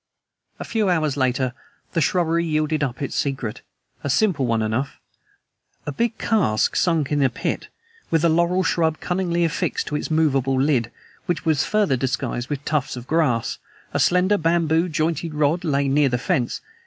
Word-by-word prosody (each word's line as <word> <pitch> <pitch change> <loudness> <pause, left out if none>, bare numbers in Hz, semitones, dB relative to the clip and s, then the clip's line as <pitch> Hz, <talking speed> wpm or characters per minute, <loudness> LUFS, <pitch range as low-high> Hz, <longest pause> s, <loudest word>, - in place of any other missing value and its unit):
A - - -6
few 220 -4 0
hours 155 -5 +1
later 130 -2 0 0.4
the 165 - +1
shrubbery 170 +1 +1
yielded 155 -1 0
up 130 0 -3
its 140 - -4
secret, 135 -6 -2 0.4
a 145 - -2
simple 145 - +2
one 115 -1 +1
enough: 110 +6 -2 0.9
A 150 - -2
big 230 - -1
cask 170 - +1
sunk 160 -6 +1
in 145 -1 +2
a 135 - +4
pit, 125 - -3 0.4
with 165 0 +2
a - - +6
laurel 170 +3 +2
shrub 160 -3 +1
cunningly 175 -2 0
affixed 165 - -1
to 150 - -3
its 150 - -3
movable 135 -5 +2
lid, 130 -5 +1 0.4
which 175 -1 -2
was 155 -3 +2
further 205 -11 +2
disguised 125 -1 -2
with 145 -1 -4
tufts 150 -4 -1
of 125 -1 -8
grass. 130 -7 0 0.3
A - - 0
slender 185 +3 +3
bamboo 165 +1 +2
jointed 160 0 -1
rod 150 +4 +1
lay 140 -4 +1
near 140 +1 +3
the 125 - 0
fence. 120 0 -1
150 Hz, 170 wpm, -22 LUFS, 135-170 Hz, 0.9 s, a